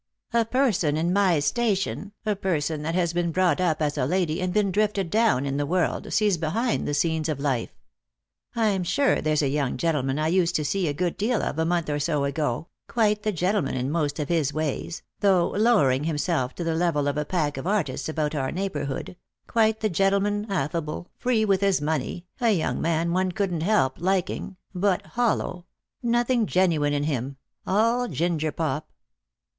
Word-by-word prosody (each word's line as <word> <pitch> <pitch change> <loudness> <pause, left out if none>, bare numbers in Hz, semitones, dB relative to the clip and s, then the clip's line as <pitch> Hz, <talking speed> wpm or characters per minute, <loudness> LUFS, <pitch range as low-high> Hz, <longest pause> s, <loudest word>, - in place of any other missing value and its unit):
A 230 -1 +3
person 220 - +1
in 170 +3 +1
my 190 -4 +3
station, 200 +5 -1
a 210 -1 +1
person 160 -5 -1
that 165 +3 -2
has 170 -2 +1
been 170 -1 0
brought 185 +1 +2
up 160 -3 +1
as 150 0 -1
a 130 - +2
lady 175 -1 0
and 185 0 -1
been 200 0 +1
drifted 205 -3 0
down 220 - +3
in 140 0 -2
the 145 - 0
world, 180 +2 0
sees 205 -5 +2
behind 220 +10 -1
the 145 - 0
scenes 160 +1 0
of 150 -3 -2
life. 135 -5 -1 0.8
I'm 210 -5 +1
sure 220 +11 +2
there's 155 0 +1
a - - +2
young 140 -1 -1
gentleman 145 -5 0
I 155 +1 +1
used 175 0 +2
to 150 - 0
see 185 +3 0
a - - +1
good 175 +4 -2
deal 225 +3 0
of 155 - -2
a 160 - +2
month 170 -1 0
or 145 -1 -1
so 145 -1 0
ago 140 0 -2
— - - -61
quite 210 -3 +2
the 215 - 0
gentleman 180 -4 0
in 130 +2 -1
most 150 -3 -1
of 150 -3 -2
his 160 -4 +1
ways, 155 +2 -3 0.2
though 190 -4 +3
lowering 175 - +3
himself 150 -4 -1
to 175 - -4
the 165 -1 0
level 160 -4 +1
of 145 - 0
a 150 - 0
pack 150 -2 -1
of 135 - -4
artists 160 -9 -1
about 155 -1 -1
our 135 -3 -1
neighbourhood 180 -4 -4 0.2
— - - -56
quite 220 -1 +2
the 215 - +1
gentleman, 200 +3 +1
affable, 165 -1 -2
free 240 -3 +1
with 195 -2 +2
his 195 -4 +3
money, 155 +3 -2
a 235 -2 +2
young 185 -7 0
man 165 +1 0
one 185 0 +1
couldn't 180 -3 -1
help 165 -8 +2
liking, 190 +1 -1 0.2
but 185 0 +1
hollow 220 -7 -1 0.2
— - - -64
nothing 240 -1 +1
genuine 165 -6 +2
in 145 0 0
him 135 -2 -2
— - - -33
all 230 +5 +2
ginger 160 -5 -1
pop." 155 -1 -3
170 Hz, 195 wpm, -25 LUFS, 150-200 Hz, 0.8 s, A